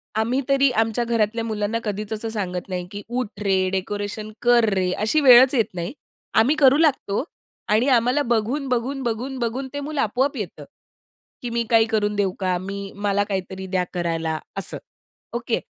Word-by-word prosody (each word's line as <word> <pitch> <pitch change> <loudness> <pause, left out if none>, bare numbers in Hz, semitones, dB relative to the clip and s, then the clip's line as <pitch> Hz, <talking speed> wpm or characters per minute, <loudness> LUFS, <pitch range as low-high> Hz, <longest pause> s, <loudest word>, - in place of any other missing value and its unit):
आम्ही 235 +5 +1
तरी 275 0 +4
आमच्या 225 +1 +1
घरातल्या 230 -1 0
मुलांना 215 +1 -1
कधीच 210 0 -3
असं 225 +1 -3
सांगत 185 -5 -3
नाही, 180 -1 -3
की 205 0 -6
"उठ 240 -4 -4
रे, 190 -1 +2
डेकोरेशन 205 +3 -4
कर 240 -1 +5
रे". 185 -1 +1
अशी 220 +9 +1
वेळच 255 0 +8
येत 230 - +3
नाही. 175 +7 -4 0.4
आम्ही 245 +8 +4
करू 275 -1 +5
लागतो, 270 -8 +1 0.5
आणि 220 +5 +3
आम्हाला 250 +5 +1
बघून-बघून 255 +3 -1
बघून-बघून 245 +2 -3
ते 285 - -3
मुलं 290 0 -2
आपोआप 260 +5 0
येतं 170 -7 -6 0.8
की 245 - -4
"मी 235 0 0
काही 225 -1 +5
करून 210 -2 0
देऊ 200 -2 +1
का?" 185 -1 0
मी, 195 +1 -6
मला 205 0 +1
काहीतरी 190 -1 -4
द्या 180 -1 +2
करायला, 165 -2 -1 0.2
असं. 195 - -1 0.6
ओके. 240 -1 -1
220 Hz, 165 wpm, -23 LUFS, 200-245 Hz, 0.8 s, वेळच